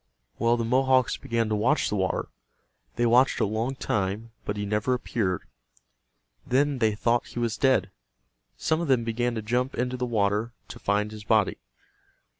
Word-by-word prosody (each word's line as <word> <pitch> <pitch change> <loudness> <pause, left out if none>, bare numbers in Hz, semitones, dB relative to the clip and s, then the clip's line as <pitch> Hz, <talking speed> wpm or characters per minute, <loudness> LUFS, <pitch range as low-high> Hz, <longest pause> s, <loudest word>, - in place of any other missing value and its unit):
Well, 120 +1 +3
the 115 - -1
Mohawks 130 +1 +3
began 115 -1 -1
to 110 - +1
watch 125 +9 +2
the - - -1
water. 95 -2 -1 0.7
They 120 - +1
watched 125 +3 +4
a - - +3
long 110 +6 -2
time, 105 0 -2
but 105 - -3
he 105 - -2
never 105 +5 +1
appeared. 100 -7 -2 1.0
Then 140 +1 +1
they 110 -3 +2
thought 115 +2 +1
he - - -11
was 115 -2 0
dead. 110 -8 +2 0.7
Some 160 +1 0
of 170 - -2
them 130 -4 +3
began 120 +1 -1
to 110 - -3
jump 125 +4 -1
into 125 +1 -1
the 125 0 -2
water 105 +1 0 0.2
to - - -9
find 105 +1 0
his 105 -1 -9
body. 110 -2 +2
115 Hz, 175 wpm, -26 LUFS, 105-125 Hz, 1.0 s, watched